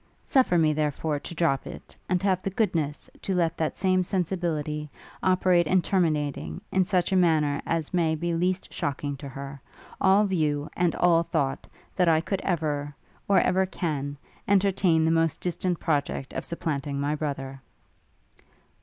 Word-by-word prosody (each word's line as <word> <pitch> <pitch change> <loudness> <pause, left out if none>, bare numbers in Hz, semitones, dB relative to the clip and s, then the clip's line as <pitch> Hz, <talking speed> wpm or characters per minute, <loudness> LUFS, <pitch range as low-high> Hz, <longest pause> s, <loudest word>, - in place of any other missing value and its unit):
Suffer 255 -10 +3
me, 155 -2 +3
therefore, 150 0 -1
to 170 - -8
drop 155 -5 +1
it; - - -10
and 180 0 +1
have 190 -2 +2
the 195 - -2
goodness 170 -8 -1
to 190 - -2
let 170 -2 +1
that 160 -1 -2
same 185 -1 +2
sensibility 165 -5 -2 0.3
operate 185 -2 +3
in 185 +4 +4
terminating, 150 - 0
in 190 - +3
such 185 -1 +1
a - - +2
manner 155 -5 +3
as 165 -1 -1
may 165 -3 +2
be 170 +2 -2
least 180 +3 -1
shocking 145 0 -2
to 140 +1 -8
her, 140 +1 -8 0.4
all 195 +2 +5
view, 155 -6 0
and 175 -2 +1
all 170 -2 +4
thought, 135 -5 -2 0.3
that 180 -2 +3
I 160 - +5 0.2
ever 155 -5 -1
could, - - -35
or 200 - +5
ever 190 +1 +2
can, 145 -6 -3 0.3
entertain 190 -4 +3
the 160 - +3
most 165 -1 +1
distant 180 0 -2
project 145 -3 -1
of - - -4
supplanting 145 -4 -3
my 145 +1 0
brother.' 135 -3 -4
165 Hz, 160 wpm, -26 LUFS, 145-185 Hz, 0.4 s, all